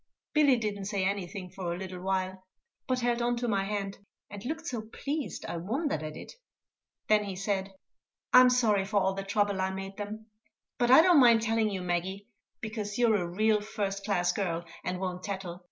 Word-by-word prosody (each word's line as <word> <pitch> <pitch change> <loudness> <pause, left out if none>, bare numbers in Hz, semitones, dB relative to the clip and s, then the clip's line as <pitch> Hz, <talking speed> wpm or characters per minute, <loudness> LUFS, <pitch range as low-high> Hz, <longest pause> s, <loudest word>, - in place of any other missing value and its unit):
Billy 285 -4 +5
didn't 205 -3 -3
say 200 -2 -1
anything 190 -1 -3
for 185 -2 -4
a 170 - -3
little 185 -1 -6
while, 190 0 -2 0.4
but 255 -1 0
held 240 0 +1
on 240 0 +1
to 240 0 -2
my 200 -3 +1
hand, 200 -1 -3 0.3
and 205 -1 -8
looked 320 +4 -4
so 240 -8 -3
pleased, 280 +6 -4
I - - -4
wondered 230 - -1
at 155 0 -6
it. - - -9 0.7
Then 210 -1 +4
he 195 -2 -5
said: 195 0 -2 0.6
"I'm 255 0 +9
sorry 225 -6 +3
for 200 +1 +1
all 190 0 +1
the 195 - -4
trouble 200 0 0
I 190 - +1
made 195 +1 -6
them; 215 +1 -6 0.5
but 240 -1 +2
I 265 +5 +9
don't 355 -4 +6
mind 235 -3 +6
telling 225 -1 +2
you, 190 -3 -4
Maggie, 180 +3 -2 0.4
because 215 -2 -4
you're 235 -3 +4
a 180 -4 0
real 210 +4 +2
first 200 -2 -3
class 180 -4 +1
girl, 175 -3 -2 0.2
and 180 0 -3
won't 180 -1 -3
tattle. 190 -4 -5
200 Hz, 195 wpm, -29 LUFS, 190-225 Hz, 0.7 s, I'm